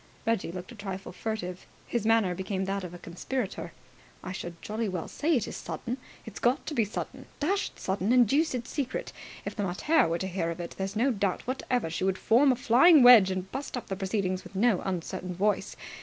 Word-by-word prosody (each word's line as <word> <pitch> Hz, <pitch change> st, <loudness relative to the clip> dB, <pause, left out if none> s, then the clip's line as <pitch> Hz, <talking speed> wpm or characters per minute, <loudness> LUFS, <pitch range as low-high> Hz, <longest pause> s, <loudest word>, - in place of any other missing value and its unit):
Reggie 225 Hz, -6 st, 0 dB
looked 180 Hz, +6 st, -7 dB
a -, -, -10 dB
trifle 195 Hz, -2 st, -6 dB
furtive. 185 Hz, -3 st, -5 dB, 0.2 s
His 230 Hz, -3 st, -1 dB
manner 225 Hz, -5 st, +3 dB
became 190 Hz, +1 st, -3 dB
that 195 Hz, 0 st, -2 dB
of 180 Hz, -, -6 dB
a 175 Hz, -, -8 dB
conspirator. 190 Hz, +6 st, -4 dB, 0.5 s
"I 185 Hz, -, -5 dB
should 175 Hz, -2 st, -6 dB
jolly 215 Hz, 0 st, -3 dB
well 180 Hz, -3 st, -4 dB
say 315 Hz, +2 st, +1 dB
it 235 Hz, -4 st, 0 dB
is -, -, -6 dB
sudden! 250 Hz, +2 st, -5 dB, 0.3 s
It's 225 Hz, -, -8 dB
got 245 Hz, +4 st, +1 dB
to 310 Hz, -, -4 dB
be 230 Hz, -6 st, +2 dB
sudden. 210 Hz, -, -6 dB
Dashed 385 Hz, +7 st, -1 dB
sudden 195 Hz, +3 st, -1 dB
and 245 Hz, -2 st, +6 dB
deuced 270 Hz, -2 st, +1 dB
secret! 270 Hz, -2 st, -3 dB, 0.3 s
If -, -, -4 dB
the 210 Hz, -, -2 dB
mater 200 Hz, -, +2 dB
were 165 Hz, +1 st, 0 dB
to 190 Hz, -, -3 dB
hear 175 Hz, -3 st, -2 dB
of 170 Hz, +1 st, -5 dB
it, 170 Hz, -, -5 dB
there's 195 Hz, +2 st, -3 dB
no 250 Hz, +5 st, +3 dB
doubt 200 Hz, -4 st, -1 dB
whatever 250 Hz, -7 st, -1 dB
she 165 Hz, -, -2 dB
would 190 Hz, 0 st, +1 dB
form 260 Hz, +8 st, +4 dB
a -, -, +2 dB
flying 255 Hz, +6 st, +6 dB
wedge 235 Hz, -6 st, +9 dB
and 185 Hz, 0 st, -3 dB
bust 270 Hz, -1 st, -4 dB
up 245 Hz, -, -7 dB
the 195 Hz, -, -1 dB
proceedings 190 Hz, -1 st, -1 dB
with -, -, -13 dB
no 210 Hz, -1 st, +3 dB
uncertain 185 Hz, 0 st, -4 dB
voice. 205 Hz, +3 st, 0 dB
205 Hz, 215 wpm, -28 LUFS, 185-245 Hz, 0.5 s, wedge